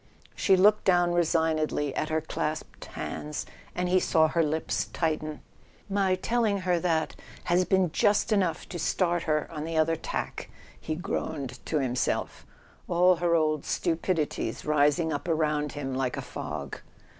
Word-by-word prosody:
She 190 -2 +4
looked 210 +3 +5
down 175 -2 +4
resignedly 160 -4 +1
at 155 - -1
her 160 0 0
clasped 155 0 -4
hands, 150 0 -5 0.3
and 180 0 0
he 185 +1 +4
saw 160 -3 +3
her 170 - +1
lips 160 0 0
tighten. 155 -2 -2 0.5
"My 195 -2 +2
telling 215 0 0
her 180 -2 +1
that 165 -2 0 0.3
has 180 +1 +2
been 190 -3 +2
just 210 +4 +2
enough 185 -6 +1
to 175 - -5
start 175 +1 +1
her 155 0 +1
on 150 -2 -5
the 165 0 -3
other 160 +1 +3
tack," - - -4 0.3
he 155 - -3
groaned 140 -6 -4
to 155 - 0
himself, 130 -3 -1 0.4
all 180 +1 +4
her 170 0 +2
old 155 -2 +1
stupidities 165 -2 -1
rising 150 +2 +2
up 145 - -4
around 150 -2 0
him 140 -2 -4
like 130 -1 -1
a - - -4
fog. - - -6
160 Hz, 155 wpm, -28 LUFS, 155-180 Hz, 0.5 s, looked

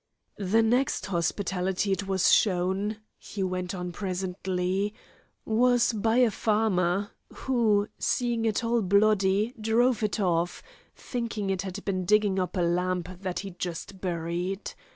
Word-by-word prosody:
"The 205 +3 +3
next 245 +5 +1
hospitality 190 +1 -1
it 195 +1 -1
was 190 -2 +3
shown," 195 +2 +1 0.2
he 200 - -5
went 185 0 -2
on 180 -1 -4
presently, 185 +1 -2 0.5
"was 245 +2 +3
by 225 +2 +1
a 245 -3 +5
farmer, 205 -3 +1 0.2
who, 220 -6 +1
seeing 240 -2 0
it 220 +1 0
all 230 0 +1
bloody, 200 +2 +3
drove 230 +2 +2
it 215 0 -1
off, 175 -3 0 0.3
thinking 225 -5 -3
it 190 -2 -1
had 195 +1 -6
been 185 -2 -1
digging 205 0 +3
up 185 +1 -2
a - - +2
lamb 180 +1 0 0.2
that 185 -3 -3
he'd 195 -3 -9
just 180 +2 -5
buried. 175 +2 -3
195 Hz, 135 wpm, -27 LUFS, 180-215 Hz, 0.5 s, a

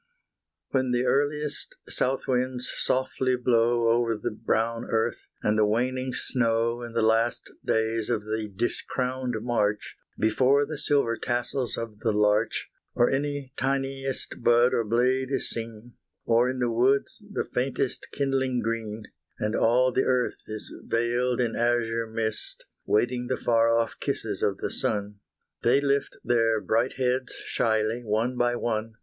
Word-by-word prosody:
When 130 -1 +1
the 125 +1 +1
earliest 145 +2 0
south 130 +1 -1
winds 125 0 0
softly 130 0 0
blow 120 -1 +2
Over 115 -1 +2
the 105 - -3
brown 115 +2 -1
earth, 115 0 -1 0.2
and 105 0 +2
the - - +5
waning 130 +4 0
snow 115 -1 0
In 120 -1 -7
the 115 -1 +1
last 115 +2 +1
days 110 0 0
of 115 -3 0
the 110 0 -3
discrowned 125 +4 -2
March, 105 -4 0 0.2
Before 130 +6 +3
the 150 0 -6
silver 140 -7 +1
tassels 120 +1 -1
of 115 -2 -6
the 110 - +1
larch, 105 +1 +1 0.2
Or 120 - +4
any 140 -1 -2
tiniest 135 0 -2
bud 120 +1 +4
or 115 - +2
blade 125 +4 +1
is 135 - 0
seen; 115 +1 -6 0.3
Or 120 +2 +3
in 130 - -3
the 120 -2 0
woods 130 - +1
the - - -2
faintest 130 +1 -2
kindling 135 -2 0
green, 110 -1 -3 0.3
And 105 +1 -1
all 125 +3 +3
the 130 - +1
earth 125 -1 0
is 110 -1 -7
veiled 120 +2 0
in 120 -2 0
azure 115 -1 +1
mist, 110 -1 -4 0.2
Waiting 120 +3 +1
the 130 - -1
far 115 -1 +3
off 115 -1 -1
kisses - - -3
of - - +1
the - - -3
sun, 105 -1 -2 0.4
They 120 +4 +4
lift 140 0 0
their 115 -2 +2
bright 115 +5 +1
heads 130 0 0
shyly 110 +1 0
one 115 +3 0
by 120 0 +1
one. 110 -2 -2
120 Hz, 150 wpm, -27 LUFS, 115-130 Hz, 0.4 s, the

